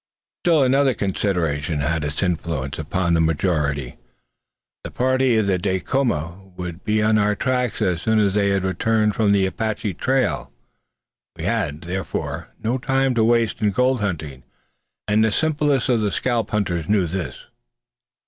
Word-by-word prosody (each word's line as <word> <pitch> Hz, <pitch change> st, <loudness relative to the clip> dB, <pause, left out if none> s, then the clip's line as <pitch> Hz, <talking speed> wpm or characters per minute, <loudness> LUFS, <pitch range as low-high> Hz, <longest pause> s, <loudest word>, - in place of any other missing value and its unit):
Still 165 Hz, -5 st, +3 dB
another 135 Hz, 0 st, +3 dB
consideration 85 Hz, -7 st, -1 dB
had 80 Hz, +2 st, 0 dB
its 75 Hz, +4 st, -2 dB
influence 80 Hz, -6 st, -2 dB
upon 85 Hz, +3 st, 0 dB
the 80 Hz, -, +3 dB
majority. 75 Hz, -5 st, 0 dB, 0.9 s
The -, -, -6 dB
party 130 Hz, -1 st, +2 dB
of 110 Hz, -, +2 dB, 0.2 s
Dacoma 95 Hz, -, -1 dB
would 90 Hz, 0 st, -6 dB
be 105 Hz, 0 st, +1 dB
on 110 Hz, 0 st, +3 dB
our 105 Hz, 0 st, +2 dB
track 125 Hz, -1 st, -1 dB
as 90 Hz, -2 st, 0 dB
soon 110 Hz, 0 st, +1 dB
as 100 Hz, -3 st, +3 dB
they 100 Hz, -1 st, +2 dB
had 100 Hz, -1 st, +1 dB
returned 105 Hz, +3 st, +1 dB
from 105 Hz, -1 st, +2 dB
the 100 Hz, -1 st, +3 dB
Apache 105 Hz, 0 st, -2 dB
trail. 130 Hz, +9 st, 0 dB, 0.8 s
We -, -, -7 dB
had, 75 Hz, +2 st, -1 dB
therefore, 90 Hz, +2 st, -4 dB
no 120 Hz, +4 st, -1 dB
time 135 Hz, +1 st, +1 dB
to 115 Hz, -2 st, +2 dB
waste 115 Hz, -1 st, +2 dB
in 105 Hz, -, +3 dB
gold 125 Hz, +5 st, +1 dB
hunting, 75 Hz, -9 st, -3 dB, 0.7 s
and 105 Hz, +1 st, +3 dB
the 110 Hz, -, +2 dB
simplest 150 Hz, -2 st, +1 dB
of 120 Hz, -4 st, +2 dB
the 105 Hz, -, +1 dB
scalp 115 Hz, +3 st, -1 dB
hunters 90 Hz, -6 st, -1 dB
knew 100 Hz, -3 st, +3 dB
this. 90 Hz, +2 st, -5 dB
100 Hz, 155 wpm, -22 LUFS, 85-115 Hz, 0.9 s, Still